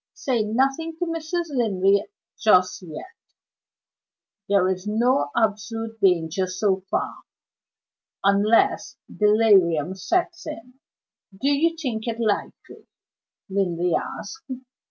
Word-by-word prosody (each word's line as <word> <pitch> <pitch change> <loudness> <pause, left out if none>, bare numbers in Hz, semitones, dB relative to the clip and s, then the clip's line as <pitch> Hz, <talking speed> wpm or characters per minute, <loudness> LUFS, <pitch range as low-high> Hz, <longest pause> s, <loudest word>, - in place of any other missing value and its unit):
"Say 250 -4 0
nothing 270 +9 0
to 350 - -1
Mrs. 330 +1 -3
Linley 200 -4 +2 0.4
just 185 -3 +3
yet. 180 - -8 1.4
There 200 -2 +3
is 185 +1 -2
no 220 - +2
absolute 225 +1 -1
danger 180 0 +2
so 190 +1 0
far, - - -2 1.0
unless 205 +1 +2 0.2
delirium 195 -7 +4
sets 340 - -2
in." 250 -3 -9 0.6
"Do 275 - +1
you 325 +4 +2
think 245 -8 -4
it 230 0 -3
likely?" 215 -3 -3 0.6
Linley 180 -3 0
asked. 440 - -5
215 Hz, 100 wpm, -23 LUFS, 190-260 Hz, 1.4 s, delirium